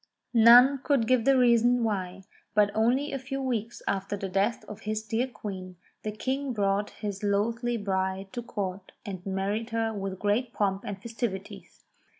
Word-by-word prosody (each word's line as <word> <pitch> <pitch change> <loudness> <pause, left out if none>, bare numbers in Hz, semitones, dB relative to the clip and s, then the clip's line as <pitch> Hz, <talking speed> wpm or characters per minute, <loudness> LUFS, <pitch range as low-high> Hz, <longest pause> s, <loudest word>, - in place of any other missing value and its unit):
None 245 +4 +8
could 275 -3 +1
give 250 -1 +2
the 275 -1 +5
reason 240 0 +4
why, 195 -3 -2 0.3
but 205 -1 +4
only 245 +6 +2
a 275 - -3
few 270 +1 -5
weeks 235 -4 -3
after 195 +1 -1
the 195 0 -4
death 200 +5 0
of 210 - -9
his 215 0 -3
dear 225 +4 -1
Queen, 190 -6 -7 0.3
the 215 - -3
King 265 +5 -2
brought 200 -1 0
this 200 -2 -3
loathly 230 +4 0
bride 190 -1 -2
to 240 - -3
Court, 195 -4 -5
and 185 -3 -6
married 200 +4 -2
her 225 -1 -1
with 195 -2 -4
great 220 +5 0
pomp 195 -1 0
and 200 -1 -5
festivities. 200 -4 -6
215 Hz, 165 wpm, -28 LUFS, 195-240 Hz, 0.3 s, None